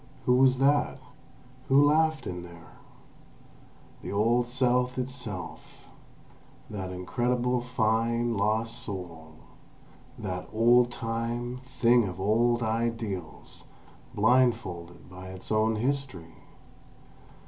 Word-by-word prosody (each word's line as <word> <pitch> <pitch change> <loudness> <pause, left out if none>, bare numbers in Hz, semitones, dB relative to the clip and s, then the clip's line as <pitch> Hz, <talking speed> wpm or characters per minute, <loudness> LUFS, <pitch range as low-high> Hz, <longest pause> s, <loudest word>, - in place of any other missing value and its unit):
Who 125 0 +4
was 130 0 +5
that? 140 +1 +2 0.7
Who 140 +2 +5
laughed 155 -2 +2
in 90 -1 -5
there? 85 -1 -13 1.3
The - - -6
old 115 +4 +2
South 125 0 +1
itself—that 125 -9 -5 1.3
incredible, 120 +7 -1
fine, 115 0 0
lost 110 +3 0
soul! 85 -7 -7 0.8
That 90 -3 -5
"old 120 +2 +4
time" 120 +1 -3
thing 120 -2 +3
of 90 0 -7
old 115 +4 +2
ideals, 110 -6 -4 0.5
blindfolded 110 -7 +1
by 90 +1 -10
its 95 +2 -9
own 110 +1 +2
history! 115 -9 -2
115 Hz, 95 wpm, -28 LUFS, 100-125 Hz, 1.3 s, was